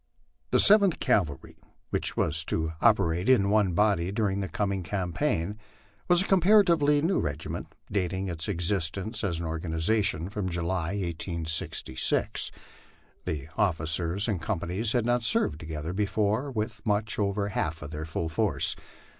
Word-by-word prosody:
The - - +3
Seventh 200 -4 +5
Cavalry, 75 -9 -1 0.3
which - - -1
was 80 +1 +1
to 80 -1 -1
operate 85 +6 +3
in 100 -6 +4
one 105 -4 +3
body 95 -2 +2
during 100 -2 0
the 95 -1 -3
coming 100 -2 -1
campaign, 90 +1 -2 0.5
was 175 +1 +5
a - - -6
comparatively 170 -6 +4
new 180 +4 +2
regiment, 75 -2 -4 0.2
dating 95 -1 -1
its 85 -3 -4
existence 95 +3 -1
as 85 -5 0
an 85 - -4
organ 80 +1 -4
ization 85 0 +1
from 100 -3 -3
July, 85 +1 -2
1866. 85 -7 -2 0.7
The 75 -2 -4
officers 85 +3 +1
and 100 -6 -1
companies 100 +4 -2
had 120 -3 +1
not 120 0 +2
served 75 -8 +2
together 80 +1 -5
before 105 +5 0
with 110 -4 -4
much 110 +2 -1
over 100 0 0
half 80 -4 -2
their 75 +1 -6
full 80 +1 -3
force. 80 - +1
95 Hz, 140 wpm, -27 LUFS, 80-110 Hz, 0.7 s, Seventh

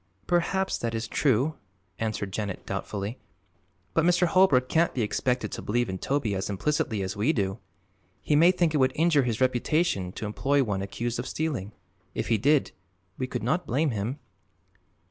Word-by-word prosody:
"Perhaps 190 +2 +1
that 115 -1 -2
is 115 0 -2
true," 135 +4 +2 0.5
answered 110 -3 -2
Janet 100 -3 -4
doubtfully; 105 +4 -4 0.7
"but 165 - +3
Mr. 175 +1 +4
Holbrook 170 -8 +4
can't 165 +4 +2
be 120 - +1
expected 125 +1 -1
to - - -5
believe 120 +1 0
in 95 0 -4
Toby 135 -4 0
as 95 +1 -2
implicitly 105 -1 -1
as 95 +2 -3
we 105 +9 +2
do. 100 -6 -1 0.6
He 150 - +1
may 165 +4 +7
think 175 -3 +2
it - - +2
would 130 -2 +3
injure 160 -2 +4
his 115 -3 -1
reputation 130 - +1
to - - -5
employ 135 +7 +1
one 100 -5 -2
accused 115 +4 -3
of - - -3
stealing. 135 -11 -2 0.4
If - - -2
he 115 -2 +3
did, 145 +5 +3 0.5
we 130 - -1
could 125 -3 -4
not 175 +10 0
blame 140 +5 +1
him." 110 +5 -3
125 Hz, 175 wpm, -27 LUFS, 105-155 Hz, 0.7 s, may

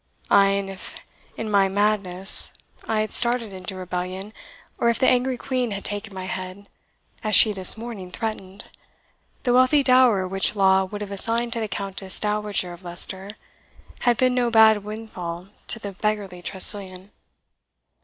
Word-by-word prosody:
Ay, 200 0 +6
and 195 0 -1
if 195 -1 -9 0.3
in 225 - -4
my 200 -2 +3
madness 195 -2 +1 0.4
I 220 -1 0
had 215 - -3
started 235 -3 +2
into 185 0 -6
rebellion, 185 +2 -5 0.5
or 235 - +2
if 235 - +1
the 260 - +2
angry 250 0 +2
Queen 255 -1 -2
had 200 -1 -6
taken 205 +1 0
my 190 -1 -7
head, 185 +2 -7 0.6
as 215 -2 +2
she 215 +2 +7
this 190 +2 +4
morning 220 -5 -8
threatened, 200 -2 -5 0.8
the 245 - +1
wealthy 255 +3 +4
dower 255 -7 +4
which 195 +3 0
law 190 -1 +3
would 205 +2 -8
have 205 -1 -6
assigned 230 +4 -1
to 235 - +1
the 220 - -2
Countess 195 -2 -2
Dowager 210 -4 -2
of 175 +2 -14
Leicester 190 +3 -3 0.6
had 240 -2 +2
been 255 0 +2
no 245 -1 +1
bad 220 -2 +5
windfall 190 -5 -7 0.2
to - - +2
the 205 -3 -7
beggarly 200 -2 -3
Tressilian. 190 0 -1
205 Hz, 160 wpm, -23 LUFS, 190-225 Hz, 0.8 s, she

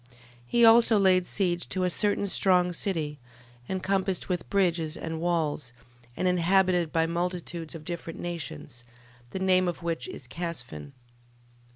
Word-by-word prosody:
12:13. 120 - -24 0.4
He 235 - +4
also 225 -1 +7
laid 185 -2 +3
siege 175 -3 -1
to 185 - 0
a 180 - +2
certain 205 +2 +1
strong 180 -2 +2
city, 155 -6 -2 0.5
encompassed 190 0 -1
with 180 -2 -2
bridges 175 -5 +1
and 160 0 -5
walls, 155 -7 -1 0.4
and 185 - 0
inhabited 180 -1 +3
by 165 0 +2
multitudes 170 -1 -4
of 155 -2 -9
different 170 -1 -6
nations, 145 - -6 0.5
the - - -5
name 185 -1 +3
of 175 0 -4
which 165 -1 -2
is - - -8
Casphin. 125 - -6
175 Hz, 145 wpm, -27 LUFS, 165-185 Hz, 0.5 s, also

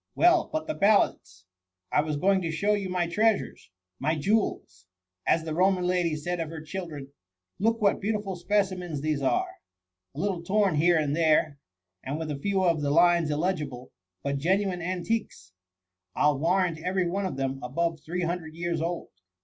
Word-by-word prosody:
Well, 350 -1 +4
but 315 0 -2
the 310 - -2
ballads; 195 - +1 0.5
I - - +4
was 150 -1 -2
going 190 +4 +3
to 165 - -2
show 180 +7 +1
you 200 -2 -2
my 180 -1 0
treasures,— 200 - 0 0.3
my 155 +4 0
jewels! 145 - -1 0.4
as 160 - +3
the 160 -1 -4
Roman 185 +2 +2
lady 180 -3 +1
said 175 +4 -3
of 165 -2 -3
her 160 0 -7
children. 155 -4 -7 0.5
Look 225 +3 +1
what 200 -3 +2
beautiful 205 -2 -2
specimens 180 -4 -1
these 155 -1 -1
are! 365 - +2 0.7
A - - -6
little 190 -1 -1
torn 195 +1 +2
here 165 +3 +4
and 150 -2 0
there, 155 -3 +2 0.4
and 140 +3 -3
with 160 -1 -4
a 140 - -4
few 195 +4 0
of 165 -4 +2
the 145 - 0
lines 170 +1 +4
illegible— 150 -6 -2 0.3
but 140 0 -1
genuine 185 +3 +1
antiques. 185 - -3 0.6
I - - 0
'11 145 -2 -1
warrant 175 -1 +1
every 180 +2 0
one 195 +2 -1
of 180 - -6
them 135 0 -2
above 165 +6 -1
three 180 +3 -3
hundred 165 -2 -3
years 170 -1 -2
old. 170 +1 -3
170 Hz, 175 wpm, -27 LUFS, 155-190 Hz, 0.7 s, Well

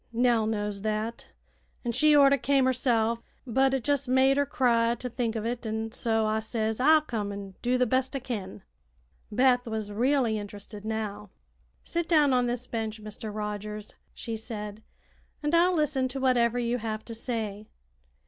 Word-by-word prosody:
Nell 235 -2 +2
knows 205 -2 -2
that, 215 +2 -3 0.6
an' 240 - 0
she 305 +5 +4
orter 280 -1 +7
came 275 0 +3
herself; 235 -3 +2 0.3
but 265 +2 +2
it 265 +1 -3
jes' 285 -1 +1
made 260 +2 +4
her 285 0 +1
cry 235 -2 +2
to 250 +2 -5
think 235 -2 -2
o' 220 - -2
it, 235 0 -3
an' 220 +1 -3
so 225 -2 0
I 215 0 +1
says 220 0 -2
I'll 310 +4 +6
come 220 -8 -3
an' 200 -1 -7
do 250 +1 +1
the 250 - +3
best 260 +3 0
I - - 0
kin." 205 -7 -6 0.7
Beth 250 +2 +3
was 220 -2 -3
really 240 0 +1
interested 205 0 -8
now. 210 -2 -4 0.5
"Sit 340 -1 -2
down 300 -5 +5
on 250 -1 +3
this 240 +1 -2
bench, 220 -2 -4
Mr. 215 +1 -7
Rogers," 210 0 -5 0.2
she 230 - -5
said, 210 -1 -6 0.6
"and 295 +2 0
I'll 350 +2 +4
listen 290 -4 +1
to 265 +2 -5
whatever 245 -2 +2
you 240 0 0
have 220 -1 -4
to 230 - -7
say." 220 -3 -4
230 Hz, 175 wpm, -28 LUFS, 215-260 Hz, 0.7 s, orter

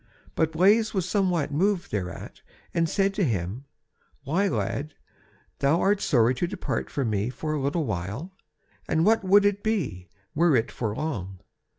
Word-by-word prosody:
But 160 0 +1
Blaise 210 +6 +3
was 185 -2 0
somewhat 180 -8 +1
moved 185 +4 0
thereat, 90 -4 -5 0.3
and 165 -1 +1
said 195 +2 +1
to 200 0 0
him: 110 - -2 0.6
"Why 170 +9 +1
lad, 150 -5 -2 0.6
thou 140 +5 +3
art 200 0 +2
sorry 120 -4 +3
to 175 - +2
depart 190 +1 -3
from 130 -6 -1
me 105 +2 0
for 155 +4 -4
a 150 - -1
little 145 +4 0
while, 105 - -4 0.6
and 160 +1 +2
what 225 -1 +3
would 200 +2 +5
it 205 0 +1
be, 160 - -2 0.2
were 165 -1 +3
it 115 -2 +1
for 110 -3 -3
long? 100 - -4
160 Hz, 165 wpm, -26 LUFS, 120-195 Hz, 0.6 s, would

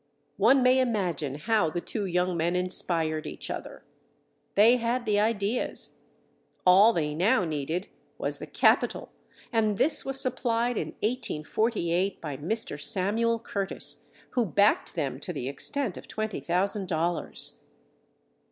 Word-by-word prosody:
One 250 +6 +5
may 255 +1 +5
imagine 180 - -1
how 210 +2 +1
the 175 - -3
two 205 +3 -3
young 180 0 0
men 170 +2 0
inspired 165 -3 0
each - - -6
other. - - -7 0.7
They 225 +5 +6
had 240 +1 -1
the 210 -2 +2
ideas; 215 +1 -1 0.7
all 195 +5 +7
they 150 -7 -1
now 185 +4 +2
needed 160 +4 -3 0.3
was - - -2
the - - -7
capital - - +2 0.4
and 215 -3 +1
this 305 - +5
was 270 0 -3
supplied 240 -1 +1
in - - -3
1848 200 -3 -1
by 150 -4 -5
Mr. 195 +11 -1
Samuel 225 +4 +1
Curtis, 200 -4 -3 0.2
who 245 - +1
backed 205 0 +2
them 140 -5 -2
to 165 - -4
the 135 -6 -4
extent 225 - -3
of - - -10
twenty 215 -2 -4
thousand 190 +3 -1
dollars. 170 0 -2
200 Hz, 135 wpm, -27 LUFS, 170-230 Hz, 0.7 s, all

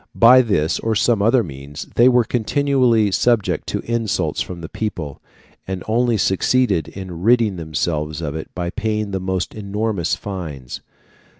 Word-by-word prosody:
By 125 +3 +7
this 95 -9 0
or 110 -1 -1
some 110 0 +2
other 115 +3 +4
means 70 -1 -8
they 120 +2 +6
were 125 -1 +4
continually 125 -2 +2
subject 115 0 +1
to - - -2
insults 115 -3 -1
from 90 -2 -6
the 80 - -6
people, 85 -10 -5 0.5
and 95 -1 -4
only 120 +1 +2
succeeded 95 -2 +1
in 90 -3 -8
ridding 115 -2 +3
themselves 80 -1 -2
of 75 -4 -4
it 80 0 -6
by 85 -1 -3
paying 110 -1 -2
the 95 - -2
most 95 -1 -2
enormous 105 -3 -2
fines. 80 -11 -7
100 Hz, 155 wpm, -20 LUFS, 85-115 Hz, 0.5 s, By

